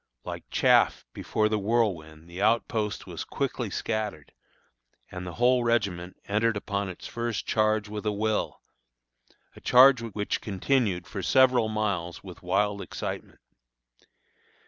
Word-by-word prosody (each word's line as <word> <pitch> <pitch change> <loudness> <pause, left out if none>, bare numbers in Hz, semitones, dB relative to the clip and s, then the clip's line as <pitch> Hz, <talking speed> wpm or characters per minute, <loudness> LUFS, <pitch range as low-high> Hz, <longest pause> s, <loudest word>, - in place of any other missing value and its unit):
Like - - -7
chaff - - +3
before 110 0 0
the 110 0 0
whirlwind 90 -8 -1
the 85 +3 -7
outpost 110 -1 0
was - - -6
quickly - - -3
scattered, 105 -9 -3 0.8
and 90 0 -6
the 90 - -6
whole 125 +1 +3
regiment 100 -7 -1
entered 110 +2 +1
upon 100 -1 -3
its 90 - -9
first 115 -2 -3
charge 110 -1 +1
with 105 0 -5
a - - +2
will, 110 +1 -2 0.9
a - - -14
charge 130 0 +6
which 105 -3 -3
continued 100 -3 0
for - - -6
several 125 -4 +4
miles 100 -6 -2
with 90 -3 -11
wild 100 +3 0
excitement. - - -6
105 Hz, 130 wpm, -27 LUFS, 95-115 Hz, 0.9 s, charge